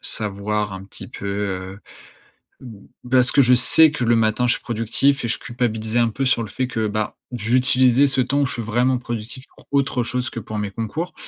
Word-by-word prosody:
savoir 105 0 -3
un 95 0 -8
petit 100 - -12
peu, 100 - -8
heu, 100 -1 -4 0.8
b 110 -6 -12 0.3
parce 125 -1 +5
que 140 - +5
je 125 0 +4
sais 155 +5 +5
que 125 -5 -3
le 120 0 +3
matin 115 +2 +1
je - - +3
suis - - -6
productif 120 +4 0
et - - -1
je 115 - -2
culpabilisais 115 -2 -2
un 115 - +3
peu 135 +5 -3
sur 125 -2 +2
le 110 - -5
fait 130 +4 -2
que, 110 -3 -2
bah, 105 +1 -3 0.2
j'utilisais 130 +3 +3
ce 135 -1 +2
temps 140 +3 0
où - - +2
je - - -3
suis 120 - -4
vraiment 120 +4 +1
productif 120 +1 -6
pour - - -20
autre 140 -3 0
chose 125 +1 -3
que 115 - -6
pour 110 0 -7
mes 105 -1 -3
concours. 135 - -5
120 Hz, 220 wpm, -21 LUFS, 105-130 Hz, 0.8 s, parce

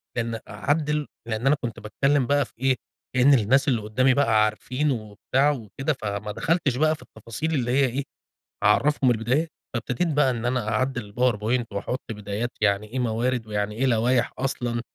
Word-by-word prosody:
بأن 115 -1 -2
أعدّل 150 +7 0 0.2
لأن 115 +3 -1
أنا 150 - +5
كنت 115 -1 -4
باتكلّم 135 +5 +1
بقى 145 0 +3
في - - -21
إيه، 135 0 +3 0.4
كأنّ 130 +3 +6
الناس 135 +4 +3
اللي 120 -5 +2
قُدّامي 130 +5 +2
بقى 115 -6 +4
عارفين 125 +7 -1
وبتاع 115 +5 0
وكده، 135 +3 -3
فما 105 0 -3
دخلتش 160 - 0
بقى 155 +3 +3
في - - -18
التفاصيل 115 +9 -5
اللي 120 -4 0
هي 135 +1 +4
إيه، 130 +3 -2 0.6
أعرّفهم 130 +5 +4
البدايات، 125 +8 0 0.2
فابتديت 125 +8 -1
بقى 145 -2 +4
إن 120 -1 -4
أنا 120 -3 0
أعدّل 120 -2 -1
الpowerpoint 120 0 +1
وأحط 110 +6 -3
بدايات 105 +3 -4
يعني 100 0 +2
ايه 130 +4 -4
موارد، 120 0 0
ويعني 105 0 -2
إيه 130 +4 0
لوايح 120 0 +2
أصلًا، 125 -3 -2
125 Hz, 170 wpm, -25 LUFS, 110-135 Hz, 0.6 s, كأنّ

